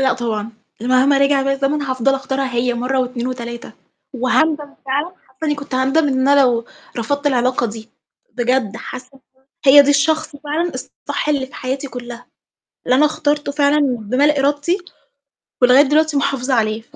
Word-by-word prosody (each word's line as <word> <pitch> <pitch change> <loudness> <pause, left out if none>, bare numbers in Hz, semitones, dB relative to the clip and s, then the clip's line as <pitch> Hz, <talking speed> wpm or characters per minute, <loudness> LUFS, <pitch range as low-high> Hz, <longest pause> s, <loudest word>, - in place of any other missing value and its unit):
لأ 265 -1 +3
طبعًا، 225 -2 -3 0.3
ال 245 - -3
مهما 265 +2 +4
رجع 275 0 +3
بيّا 275 0 0
الزمن 275 +2 -1
هافضل 260 0 0
أختارها 265 -1 -3
هي 245 0 0
مَرّة 250 +2 -1
و2 250 -1 -3
و3 235 -1 -6 0.4
وهاندم 290 +4 0
فعلًا 285 +4 0 0.2
حاسّة 260 +4 -9
إنّي 295 -1 +1
كنت 285 -2 -7
هاندم 270 +4 +2
إن 260 0 +1
أنا 285 0 +5
لو 240 -3 +2 0.3
رفضت 285 +5 -2
العلاقة 250 -2 +1
دي، 220 +1 -9 0.5
بجد 240 -3 0
حاسّة 255 0 -8
إن 270 - -19 0.2
ده 265 0 -35 0.2
هي 285 +1 +9
دي 285 - +2
الشخص 310 +1 +1
فعلًا 305 +4 -3
الصح - - -5
اللي 280 -3 0
في - - -19
حياتي 265 +2 -4
كلّها، 245 -1 -9 0.6
اللي 250 - +3
أنا 300 +2 +5
اخترته 295 -1 -1
فعلًا 290 +1 +2 0.2
بمال 275 +7 +1
إرادتي 290 +6 +1 0.8
ولغاية 250 +3 +7
دلوقتي 300 +1 +2
محافظة 270 -2 0
عليها 220 -1 0
270 Hz, 170 wpm, -18 LUFS, 250-290 Hz, 0.8 s, هي